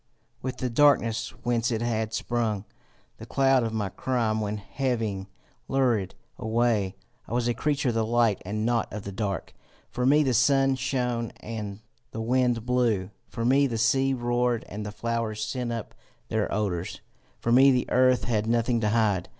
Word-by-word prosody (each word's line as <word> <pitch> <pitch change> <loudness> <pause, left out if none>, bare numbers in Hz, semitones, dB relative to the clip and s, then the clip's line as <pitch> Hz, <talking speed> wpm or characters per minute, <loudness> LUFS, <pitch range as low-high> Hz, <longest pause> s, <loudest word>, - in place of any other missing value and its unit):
With 130 -1 -4
the 125 - -2
darkness 120 -4 +3
whence 120 -1 +1
it 115 -1 -1
had 110 -2 -1
sprung, 110 -3 -1 0.5
the - - -10
cloud 135 -1 +3
of 115 -1 -1
my 105 -3 -2
crime 115 -1 -1
went 105 0 -3
heaving 110 -4 -2 0.4
lurid 120 -8 +1 0.2
away. 110 -4 +1 0.3
I - - -6
was 120 0 +1
a 120 - +2
creature 145 0 0
of - - 0
the 115 0 +1
light 115 -2 +2
and 105 +3 -2
not 120 -2 0
of 105 -1 -6
the 100 - -6
dark. 100 -1 -3 0.4
For 125 - -2
me 150 +3 +5
the 130 -3 +1
sun 135 +3 +4
shone 125 -3 -1
and 105 -2 -6 0.3
the 115 - -7
wind 120 0 +1
blew; 115 -6 +1 0.2
for 115 -1 -3
me 140 +3 +4
the 115 -3 -3
sea 135 +3 +2
roared 120 -1 0
and 105 +1 -6
the 105 - -5
flowers 115 -1 -2
sent 125 -2 -3
up 115 -2 -5 0.4
their - - -1
odours. 95 -4 -2 0.4
For 115 - -1
me 135 +3 +7
the 125 -2 +2
earth 130 0 +4
had 110 -3 0
nothing 115 0 +1
to 105 - +1
hide. 105 -5 +1
115 Hz, 175 wpm, -26 LUFS, 110-125 Hz, 0.5 s, me